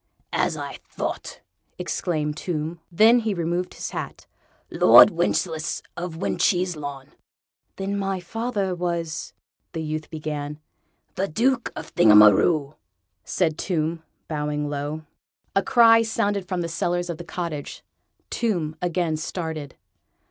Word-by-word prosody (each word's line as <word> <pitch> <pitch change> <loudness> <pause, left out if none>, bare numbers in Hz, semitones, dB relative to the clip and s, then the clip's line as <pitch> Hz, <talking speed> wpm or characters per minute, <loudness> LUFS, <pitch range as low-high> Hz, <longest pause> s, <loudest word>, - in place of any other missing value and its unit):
"As - - +1
I - - -6
thought!" - - -5 0.4
exclaimed 150 -4 -2
Tomb; 160 0 -3
then 220 +7 +6
he 220 -3 -1
removed 175 +1 -2
his - - -5
hat. - - -6 0.5
"Lord - - +8
Wencheslaus 170 -2 -1
of 175 -2 -5
When 185 - -2
cheeselawn!" 150 -7 0 0.7
"Then 200 +1 -2
my 195 -1 -1
father 205 0 -2
was.. 170 -3 -3 0.2
." - - -53
the 160 - -3
youth 155 0 -4
began. 150 -1 -5 0.5
"The 195 - -1
Duke 240 +8 +1
of - - -8
Thingamaroo," 110 - +6 0.5
said 160 -4 0
Tomb, 165 -2 -1 0.3
bowing 150 -1 -2
low. 145 +2 -4 0.5
A 195 - +4
cry 230 +2 +6
sounded 205 -4 -1
from 185 -2 -2
the 170 - -2
cellars 175 +1 -1
of 165 - -7
the - - -6
cottage. 170 -4 -5 0.5
Tomb 175 -10 -1
again 175 -2 0
started. 160 -3 -5
170 Hz, 125 wpm, -24 LUFS, 155-190 Hz, 0.7 s, Lord